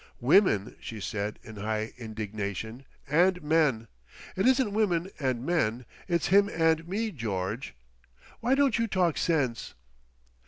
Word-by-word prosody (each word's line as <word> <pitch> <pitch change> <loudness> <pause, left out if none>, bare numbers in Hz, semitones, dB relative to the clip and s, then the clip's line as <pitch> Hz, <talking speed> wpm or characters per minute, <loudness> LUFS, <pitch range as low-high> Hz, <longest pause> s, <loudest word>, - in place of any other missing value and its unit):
"Women!" 130 - +3
she 110 - -7
said 105 +1 -3
in 110 -1 -11
high 110 +1 -2
indignation, 110 +1 -5 0.2
"and 180 +6 +3
men! 150 -7 +2 0.5
It 190 +5 +2
isn't 260 -5 +3
women 190 -4 +1
and 130 -3 -1
men—it's 155 - -1
him 200 +2 +5
and 165 -1 +1
me, 215 +4 -2
George! 110 - -4 0.6
Why 245 +3 +2
don't 275 -4 +2
you 230 - +1
talk 180 -5 +1
sense? 135 -9 -1
150 Hz, 125 wpm, -28 LUFS, -, 0.6 s, him